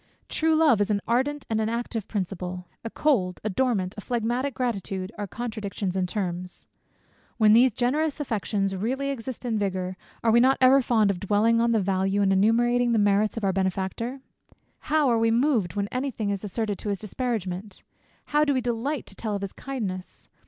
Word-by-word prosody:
True 320 0 +2
love 300 -9 +4
is 205 - +1
an 205 -1 +2
ardent, 270 +5 0
and 220 -1 0
an 215 - 0
active 230 -2 -3
principle 180 -2 -4 0.2
a 230 - -4
cold, 210 -11 +1
a 215 - -1
dormant, 200 -5 0
a - - -6
phlegmatic 240 +4 -1
gratitude, 195 -6 -3
are 205 -1 -4
contractions 210 -4 -4
in 185 -1 0
terms. 180 -2 -4 0.7
When 215 -2 +6
these 245 +3 +7
generous 275 +7 0
affections 205 -6 -1
really 260 +8 -2
exist 255 -1 -6
in 225 -3 0
vigour, 185 -2 -2 0.3
are 230 - +4
we 235 - +6
not 260 +2 +4
ever 265 +1 +6
fond 220 -5 +3
of 185 - -5
dwelling 215 +4 +2
on 235 0 +2
the 225 - +3
value, 195 +1 +1
and 195 -1 +3
enumerating 240 +4 +3
the - - +3
merits 205 +1 +2
of 225 - -3
our 195 -1 +2
benefactor? 195 +7 -2 0.7
How 305 -1 +3
are 235 -2 +3
we 225 0 +3
moved 230 - +1
when 200 -1 -1
any 260 +2 -2
thing 215 -5 -2
is 200 0 -3
asserted 210 -1 -2
to 210 - -4
his 200 - 0
disparagement! 205 -3 -4 0.4
How 295 +1 +2
do 285 -2 +2
we 255 - +1
delight 245 +4 -2
to 195 - -9
tell 215 -1 -3
of 200 - -4
his 195 - -5
kindness! 200 -9 -6
220 Hz, 195 wpm, -26 LUFS, 195-245 Hz, 0.7 s, these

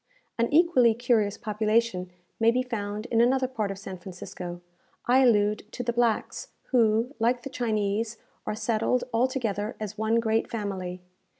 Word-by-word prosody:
An 235 - +1
equally 285 -8 +5
curious 230 -4 +1
population 215 -3 0 0.3
may 225 0 +5
be 250 +2 +2
found 210 -3 -4
in 230 -1 +4
another 260 +2 +3
part 220 -6 -2
of 195 - -5
San 190 -2 -8
Francisco. 175 -1 -8 0.5
I 250 +2 +5
allude 210 -4 +2
to 245 - -4
the 235 0 -1
blacks, 235 -2 0 0.2
who, 230 +1 +3
like 240 +2 +1
the 275 - -6
Chinese, 220 -1 -1 0.3
are - - -1
settled 225 +2 0
altogether 230 -3 0
as 215 0 -6
one 220 +1 +2
great 225 -1 0
family. 185 -5 -4
225 Hz, 155 wpm, -27 LUFS, 205-240 Hz, 0.5 s, equally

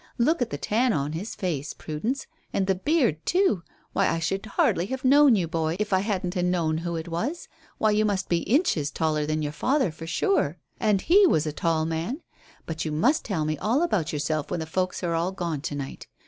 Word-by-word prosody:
Look 285 +6 +2
at 240 - +1
the - - -4
tan 235 +3 +1
on 145 -2 -1
his 175 +8 -5
face, 155 -6 -3
Prudence, 220 - -3 0.3
and 195 - 0
the 190 - +2
beard 230 - +1
too. 360 - +2 0.3
Why, - - +2
I - - +1
should 180 +4 -1
hardly 185 -3 +1
have 265 +3 -4
known 280 -1 +7
you, 180 -5 0
boy, 160 -1 -1
if 210 -1 -1
I 190 - +5
hadn't 190 -2 -2
'a 180 - +1
known 170 -3 +1
who 170 0 -3
it 160 0 -4
was. 230 - -3 0.3
Why, 215 - +3
you 210 +1 +3
must 200 -3 0
be 170 - +2
inches 200 - +1
taller 155 -1 0
than 155 0 -1
your 145 - -2
father 260 - +1
for 165 +1 -9
sure 175 - +1 0.2
and 210 -3 +2
he 390 +3 +6
was 155 - +2
a 155 - -3
tall 160 0 0
man. 165 - -3 0.4
But 160 -1 -4
you 155 - -3
must 240 - +2
tell 170 -8 -1
me 155 -1 -2
all 235 - +2
about 185 - 0
yourself 150 0 -2
when - - -2
the 160 - -3
folks 185 +3 -2
are 170 -1 0
all 170 +3 0
gone 170 -6 -3
to 145 -1 -4
night. 140 -1 -6
180 Hz, 225 wpm, -26 LUFS, 160-225 Hz, 0.4 s, known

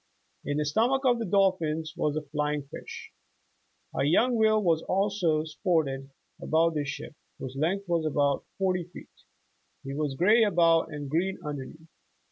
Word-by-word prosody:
In 145 - -2
the 150 - 0
stomach 235 - +1
of 245 -2 +3
the 225 - -3
dolphin 180 -5 +2
was 150 -4 -1
a 155 - -2
flying 150 0 -2
fish. 140 - -10 0.8
A - - +1
young 220 - +3
whale 215 -2 +3 0.2
also 190 -5 +1
sported 150 -4 -1 0.3
about 165 +1 +2
the 150 -2 -1
ship, 140 - -6 0.2
whose 130 0 -7
length 180 +8 -1
was 170 -2 0
about 140 -2 +1
forty 185 -3 0
feet. 175 - -13 0.7
He 135 - -6
was 145 -1 -2
gray 215 - +5
above 170 -5 +3
and 145 -1 -6
green 175 +7 0
underneath. 150 +2 -7
160 Hz, 150 wpm, -28 LUFS, 150-190 Hz, 0.8 s, gray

